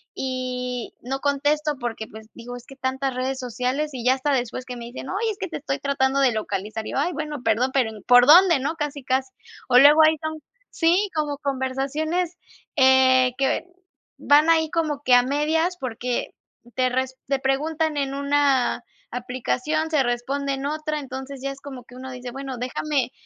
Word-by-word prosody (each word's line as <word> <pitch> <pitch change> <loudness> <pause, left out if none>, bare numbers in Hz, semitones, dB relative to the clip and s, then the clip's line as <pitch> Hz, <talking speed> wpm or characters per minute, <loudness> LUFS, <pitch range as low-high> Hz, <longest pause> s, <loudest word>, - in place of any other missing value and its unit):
y 250 -2 -4
no 265 +3 -3
contesto 290 +2 +1
porque, 230 -3 -4
pues, 220 0 -12
digo, 245 +1 -9
es 245 - -13
que 270 - -13
tantas 265 0 -2
redes 260 +1 -2
sociales, 255 +4 -2
y 245 -2 -6
ya 255 - +5
hasta 270 +2 -1
después 250 0 -2
que 250 -1 -7
me 235 - -7
dicen: 250 +2 -8
"Oye, 435 +4 -1
es 410 - -8
que 380 - -3
te - - -4
estoy 275 0 -3
tratando 275 -1 +1
de 260 - +4
localizar". 215 +1 -4
Y - - -5
yo: - - -1
"Ay, 345 +5 +1
bueno, 300 -5 -5
perdón, 230 +4 +2
pero 255 -5 +2
en 215 -2 -11
¿Por 245 0 +7
dónde?", 345 +1 +8
¿no?, 285 +5 -2
casi, 295 -2 -4
casi. 260 +1 0 0.4
O 250 0 +7
luego 295 +3 +8
ahí 315 +1 +4
son, 315 0 -4 0.3
sí, 365 +4 +2
como 295 -2 -1
conversaciones, 285 +6 -2 0.4
eh, 260 -1 +5
que 270 +4 +1 0.5
van 300 +3 +4
ahí 320 -1 +4
como 310 -4 -1
que 255 - +3
a 245 - +6
medias, 315 +6 0
porque 250 -1 -3 0.4
te 255 0 +2
res 260 +1 -2
te 275 0 0
preguntan 300 +3 0
en 275 -1 -1
una 280 -2 +2 0.3
aplicación, 255 +5 -2
se 300 -4 +3
responde 270 +3 -1
en 270 0 -4
otra. 305 +1 -2
Entonces, 265 0 -7
ya 275 0 -2
es 275 0 -11
como 265 -4 -9
que 250 - -15
uno 260 +1 -8
dice: 250 -1 -7
"Bueno, 270 0 -6
déjame 255 +1 -1
270 Hz, 190 wpm, -23 LUFS, 250-295 Hz, 0.5 s, dónde